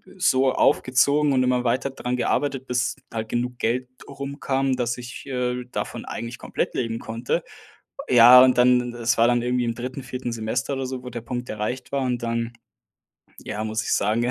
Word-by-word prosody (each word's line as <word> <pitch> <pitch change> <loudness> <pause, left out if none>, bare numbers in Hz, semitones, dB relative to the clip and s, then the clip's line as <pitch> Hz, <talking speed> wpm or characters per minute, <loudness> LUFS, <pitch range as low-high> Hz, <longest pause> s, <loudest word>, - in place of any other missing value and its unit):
so 135 -8 +3
aufgezogen 140 +3 +3
und 130 -1 +3
immer 125 0 +1
weiter 130 +3 +1
daran 125 -2 -3
gearbeitet, 135 +1 -1
bis 125 0 0 0.2
halt 110 -1 -3
genug 120 +2 -3
Geld 125 +2 -1 0.2
rum 140 +1 -7
kam, 135 -1 0
dass 120 0 -1
ich, 125 0 -9
äh, 125 -1 -2
davon - - -4
eigentlich 115 +1 -6
komplett - - -3
leben 115 -2 -2
konnte. 115 +2 -2 0.7
Ja, 125 +1 +9
und 130 -1 +4
dann 125 -1 +4
das 120 0 0
war 115 - +6
dann 120 0 +2
irgendwie 125 0 0
im 115 -1 -1
3., 125 +3 -6
4. 125 -1 -5
Semester 115 +4 -2
oder 135 -1 -3
so, 130 -1 -5
wo 125 - -7
der 120 -1 -6
Punkt 125 +1 -5
erreicht 110 +4 -4
war 140 -1 -1
und 125 -2 -1
dann, 115 0 -2 0.9
ja, 105 - -4
muss 110 0 -2
ich - - -2
sagen, 110 +4 +1
ja, 120 - +1
125 Hz, 195 wpm, -24 LUFS, 120-130 Hz, 0.9 s, Ja